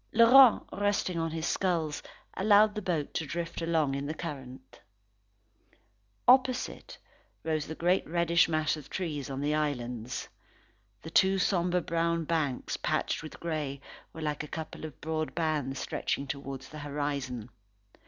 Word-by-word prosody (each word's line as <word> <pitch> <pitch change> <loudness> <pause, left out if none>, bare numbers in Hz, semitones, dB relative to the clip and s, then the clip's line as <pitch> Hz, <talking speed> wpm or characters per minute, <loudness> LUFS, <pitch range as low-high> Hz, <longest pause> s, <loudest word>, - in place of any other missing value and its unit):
Laurent, 235 +2 +8
resting 200 -3 0
on 165 0 0
his 160 0 -3
skulls, 165 -7 0 0.3
allowed 210 +1 +5
the 210 - -4
boat 165 -6 -2
to - - -1
drift 170 +3 -4
along 160 -4 +1
in 140 +1 -3
the 155 - -3
current. 135 -6 -8 1.5
Opposite, 255 0 +3 0.5
rose 155 -2 -1
the 160 - -5
great 180 +3 +1
reddish 170 0 +3
mass 155 -1 +1
of 150 -2 -11
trees 150 -7 -3
on 135 0 -4
the 145 +1 +1
islands. 125 -6 -2 0.8
The 160 - -8
two 190 +3 +4
sombre 180 -1 +2
brown 170 0 0
banks, 150 -6 -1
patched - - -1
with 155 - -9
grey, 150 -5 -3 0.3
were 160 - -7
like 150 -1 -2
a - - -7
couple 160 0 -6
of 155 - -9
broad 155 0 -2
bands 150 -5 -1
stretching 140 - -2
towards 135 -1 -6
the 155 - -9
horizon. 140 -5 -3
160 Hz, 145 wpm, -30 LUFS, 145-170 Hz, 1.5 s, Laurent